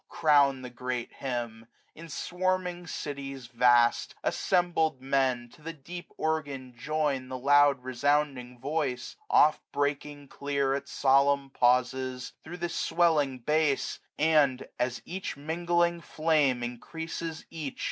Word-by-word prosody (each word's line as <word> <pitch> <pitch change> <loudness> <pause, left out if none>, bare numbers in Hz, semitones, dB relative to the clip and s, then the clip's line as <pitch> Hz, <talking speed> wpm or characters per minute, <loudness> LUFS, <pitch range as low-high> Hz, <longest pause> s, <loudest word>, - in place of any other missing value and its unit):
Crown 140 -4 +3
the 125 - -7
great 125 0 -4
hymn! 120 -3 -4 0.3
in 165 +1 -11
swarming 180 +1 -2
cities 135 -3 -5
vast. 120 0 +3
Assembled 170 -5 +1
men, 130 -2 0
to 155 - -19
the 165 +2 -6
deep 170 +4 -9
organ 140 -5 -2
join 140 0 -1
The 130 - -4
long 145 +1 +5
resounding 130 0 0
voice, 135 -2 -2
oft 155 +1 +5
breaking 145 0 -2
clear, 140 -1 -1
85 140 - -1
At 140 - -18
solemn 140 0 +3
pauses, 125 +1 +1
through 175 +3 -8
the 175 0 -2
swelling 155 -7 +2
bass; 150 +2 0 0.2
And, 150 -4 +3
as 125 0 -1
each 185 -4 -5
mingling 170 +3 0
flame 155 -7 +1
increases 160 +6 -5
each. 155 -5 -6
140 Hz, 125 wpm, -29 LUFS, 130-160 Hz, 0.3 s, long